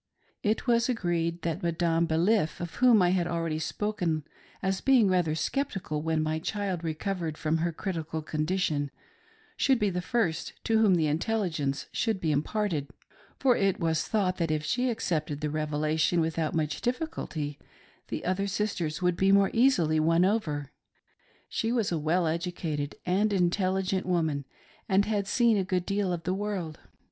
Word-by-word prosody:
It 215 Hz, +1 st, 0 dB
was 235 Hz, 0 st, +3 dB
agreed 175 Hz, -6 st, -1 dB
that 165 Hz, 0 st, -2 dB
Madame 170 Hz, 0 st, +1 dB
Baliff, 165 Hz, +2 st, +2 dB
of 175 Hz, -1 st, -5 dB
whom 240 Hz, -6 st, +6 dB
I 175 Hz, -, +4 dB
have 180 Hz, -2 st, +1 dB
already 165 Hz, -2 st, -1 dB
spoken 175 Hz, -4 st, -1 dB, 0.4 s
as 190 Hz, 0 st, 0 dB
being 255 Hz, -6 st, +5 dB
rather 175 Hz, -4 st, +2 dB
sceptical 185 Hz, -, -2 dB
when 160 Hz, 0 st, 0 dB
my 155 Hz, 0 st, -1 dB
child 190 Hz, -1 st, -3 dB
recovered 165 Hz, 0 st, -3 dB
from 155 Hz, +1 st, 0 dB
her 170 Hz, +1 st, 0 dB
critical 160 Hz, -3 st, -4 dB
condition, 155 Hz, -2 st, -1 dB, 0.7 s
should 265 Hz, -2 st, +3 dB
be 210 Hz, -3 st, +1 dB
the 180 Hz, 0 st, -2 dB
first 180 Hz, -6 st, -1 dB
to 225 Hz, -1 st, +2 dB
whom 205 Hz, -4 st, +5 dB
the 165 Hz, -2 st, +2 dB
intelligence 155 Hz, -4 st, -1 dB
should 220 Hz, -4 st, 0 dB
be 160 Hz, -3 st, 0 dB
imparted, 155 Hz, 0 st, -1 dB, 0.5 s
for 255 Hz, -3 st, +3 dB
it 195 Hz, -1 st, +1 dB
was 160 Hz, -2 st, 0 dB
thought 190 Hz, -4 st, +1 dB
that 170 Hz, -2 st, 0 dB
if 155 Hz, -1 st, -1 dB
she 250 Hz, +8 st, +1 dB
accepted 155 Hz, -10 st, -2 dB
the 150 Hz, 0 st, -2 dB
Revelation 155 Hz, +2 st, +1 dB
without 160 Hz, 0 st, -1 dB
much 155 Hz, -2 st, -1 dB
diffi 255 Hz, +7 st, -1 dB
culty, 150 Hz, -, -5 dB, 0.5 s
the -, -, -5 dB
other 185 Hz, +2 st, 0 dB
sisters 185 Hz, -5 st, -2 dB
would 180 Hz, -1 st, +2 dB
be 195 Hz, +2 st, +3 dB
more 195 Hz, 0 st, +5 dB
easily 185 Hz, -, +3 dB
won 165 Hz, +3 st, +4 dB
over. 150 Hz, -, -1 dB, 0.8 s
She 225 Hz, -, -1 dB
was 230 Hz, -6 st, +1 dB
a 165 Hz, -, 0 dB
well 165 Hz, +4 st, +1 dB
educated 160 Hz, -3 st, -2 dB
and 200 Hz, +4 st, +2 dB
intelligent 185 Hz, 0 st, +1 dB
woman, 160 Hz, -6 st, 0 dB, 0.4 s
and 195 Hz, +1 st, +4 dB
had 205 Hz, -2 st, -1 dB
seen 235 Hz, 0 st, +3 dB
a 195 Hz, -, +1 dB
good 185 Hz, -1 st, -1 dB
deal 200 Hz, -2 st, 0 dB
of 170 Hz, -2 st, -3 dB
the 180 Hz, -, 0 dB
world. 190 Hz, -6 st, -3 dB
175 Hz, 165 wpm, -28 LUFS, 160-200 Hz, 0.8 s, whom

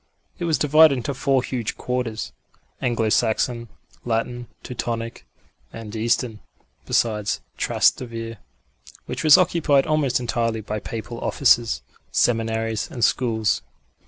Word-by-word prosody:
It 175 Hz, -, -2 dB
was 160 Hz, -2 st, +2 dB
divided 155 Hz, 0 st, +6 dB
into 125 Hz, +3 st, -3 dB
four 135 Hz, 0 st, +1 dB
huge 120 Hz, -5 st, -3 dB
quarters 125 Hz, -3 st, -3 dB, 0.5 s
Anglo 115 Hz, -3 st, +1 dB
Saxon, 115 Hz, +2 st, +1 dB, 0.4 s
Latin, 120 Hz, +1 st, -2 dB, 0.2 s
Teutonic 115 Hz, -1 st, -4 dB, 0.4 s
and 115 Hz, -1 st, -8 dB
Eastern 115 Hz, 0 st, 0 dB, 0.5 s
besides 105 Hz, -3 st, +1 dB, 0.2 s
Trastevere, 115 Hz, -2 st, 0 dB, 0.7 s
which -, -, -4 dB
was 155 Hz, -2 st, +8 dB
occupied 160 Hz, -6 st, +3 dB
almost 150 Hz, -5 st, +1 dB
entirely 115 Hz, -2 st, -1 dB
by 105 Hz, 0 st, -4 dB
Papal 115 Hz, +2 st, -6 dB
offices, 120 Hz, -4 st, +2 dB, 0.3 s
seminaries, 115 Hz, -2 st, 0 dB
and 120 Hz, -, -4 dB
schools. 110 Hz, -4 st, +1 dB
120 Hz, 110 wpm, -23 LUFS, 115-130 Hz, 0.7 s, was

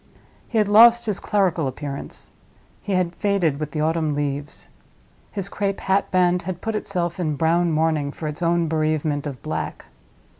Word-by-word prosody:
He 230 Hz, -, -1 dB
had 210 Hz, -2 st, +3 dB
lost 235 Hz, +3 st, +7 dB
his 210 Hz, -3 st, -1 dB
clerical 180 Hz, -7 st, +1 dB
appearance—he 140 Hz, +7 st, -9 dB
had 180 Hz, -2 st, +1 dB
faded 180 Hz, -8 st, 0 dB
with 155 Hz, -1 st, -3 dB
the 150 Hz, 0 st, -3 dB
autumn 155 Hz, -1 st, 0 dB
leaves. 145 Hz, 0 st, -4 dB, 0.6 s
His 195 Hz, -3 st, -3 dB
crape 200 Hz, -1 st, -2 dB
hat 195 Hz, +1 st, +1 dB
band 180 Hz, -1 st, +2 dB
had 180 Hz, 0 st, -5 dB
put 225 Hz, +3 st, -3 dB
itself 180 Hz, -4 st, -2 dB
in 155 Hz, -4 st, -1 dB
brown 170 Hz, +3 st, +2 dB
mourning 155 Hz, -2 st, +1 dB
for 155 Hz, -, -6 dB
its 150 Hz, +3 st, -6 dB
own 170 Hz, -1 st, +2 dB
bereavement 155 Hz, -2 st, 0 dB
of 135 Hz, -4 st, -6 dB
black. -, -, -4 dB
170 Hz, 160 wpm, -22 LUFS, 150-195 Hz, 0.6 s, lost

